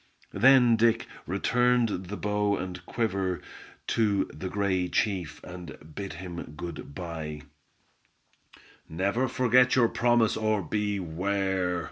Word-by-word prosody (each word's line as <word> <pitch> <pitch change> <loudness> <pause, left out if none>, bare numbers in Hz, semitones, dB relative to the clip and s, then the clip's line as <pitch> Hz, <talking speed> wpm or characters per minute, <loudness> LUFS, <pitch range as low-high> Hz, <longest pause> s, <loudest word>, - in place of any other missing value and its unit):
Then 125 -3 +6
Dick 115 0 +3 0.2
returned 120 +1 +1
the 105 +3 -5
bow 105 -1 0
and 90 -1 -6
quiver 95 -6 -1 0.5
to 105 -4 +2
the 95 - -5
gray 95 -3 0
chief, 90 -6 -1
and 90 -3 -9 0.2
bid 100 +2 -5
him 85 -4 -7
good 85 -4 -7
by. 80 -4 -6 1.5
"Never 100 +10 0
forget 125 0 +4
your 120 -3 +4
promise, 115 -1 +2
or 110 -2 0
beware!" 95 -1 -1
100 Hz, 110 wpm, -28 LUFS, 90-115 Hz, 1.5 s, Then